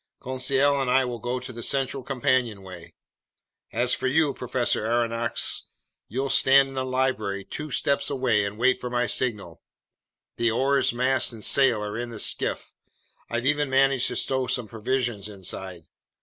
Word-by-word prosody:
Conseil 135 +2 +1
and 130 - -1
I 130 +1 +3
will 120 -1 -5
go 125 +2 -3
to 130 +1 -9
the 115 - -7
central 135 +1 -1
companionway. 115 -9 -2 0.8
As - - +2
for - - -1
you, 145 +1 +2
Professor 125 -3 0
Aronnax, 115 0 -1 0.4
you'll 130 +4 -2
stay 135 0 +5
in 135 0 0
the 130 -1 -2
library 130 -7 -1
two 150 +9 -6
steps 140 +1 0
away 130 -7 +1
and 100 +1 -4
wait 130 +3 +2
for 125 - -4
my 120 0 0
signal. 105 -10 -2 0.8
The 115 0 +2
oars, 135 +4 +2
mast, 130 +2 +1
and 110 -2 -5
sail 125 -6 +3
are 105 +2 -5
in 120 0 -4
the 115 - -8
skiff. - - -1 0.6
I've 120 +1 -2
even 145 0 +2
managed 135 -1 +3
to - - -2
stow 130 -1 0
some 125 -3 0
provisions 115 -2 -2
inside. 95 -3 -6
125 Hz, 165 wpm, -25 LUFS, 115-135 Hz, 0.8 s, stay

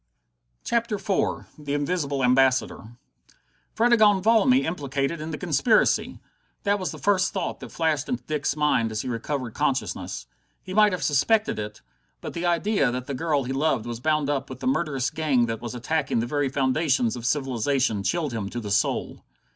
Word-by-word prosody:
CHAPTER 235 -2 0
IV 200 -1 -1
The 145 -1 -3
Invisible 145 -2 -1
Ambassador 125 -2 +2 0.8
Fredegonde 220 -4 +4
Valmy 230 +4 +4
implicated 145 -1 -2
in 155 - -5
the 155 - -4
conspiracy! 190 - +2 0.4
That 205 0 +1
was 185 - -2
the - - -7
first 200 0 +1
thought 190 -4 -3
that - - -9
flashed 155 -3 0
into 125 0 -2
Dick's 150 +2 -1
mind 150 -7 +1
as 110 0 -3
he - - -6
recovered 125 0 -3
consciousness. - - -2 0.4
He 185 - -7
might 210 0 +5
have 180 -2 -3
suspected 160 - +2
it! 105 -5 -6 0.4
But - - -7
the 170 +1 -2
idea 175 - +2
that 125 0 -4
the 140 - -4
girl 150 0 0
he 130 +2 -3
loved 135 -5 0
was 120 -1 -5
bound 150 +1 +1
up 140 -2 -2
with 130 -1 -8
the - - -6
murderous 150 - 0
gang 145 -7 +1
that 115 -1 -4
was 120 0 -6
attacking 145 +4 -1
the 115 - 0
very 145 +2 0
foundations 130 -2 +1
of 120 - -7
civilization 130 -4 0
chilled 140 - -1
him 105 -3 -3
to 120 - -5
the 105 -3 -6
soul. 100 - 0
145 Hz, 180 wpm, -25 LUFS, 125-175 Hz, 0.8 s, might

